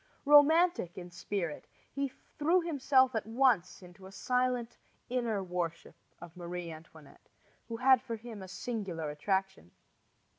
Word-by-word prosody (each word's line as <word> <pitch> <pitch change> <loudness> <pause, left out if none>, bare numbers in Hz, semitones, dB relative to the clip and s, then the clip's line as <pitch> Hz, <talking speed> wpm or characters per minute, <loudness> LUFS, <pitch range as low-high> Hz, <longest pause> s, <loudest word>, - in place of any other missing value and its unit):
Romantic 295 - +5
in 180 -1 -8
spirit, 175 -3 -4 0.2
he 280 0 -1
threw 320 +6 -1
himself 270 -5 +3
at 220 -2 -2
once 225 -7 +1
into 180 +1 -13
a - - -13
silent 250 +1 -1 0.3
inner 235 -5 -1
worship 175 -2 -4 0.3
of 175 0 -12
Marie 175 -1 -6
Antoinette, 155 -2 -15 0.4
who 230 -1 -5
had 260 +1 +5
for 230 -3 -5
him 225 -2 -9
a 190 - -8
singular 185 -7 -4
attraction. 190 - -2
215 Hz, 135 wpm, -31 LUFS, 175-255 Hz, 0.4 s, Romantic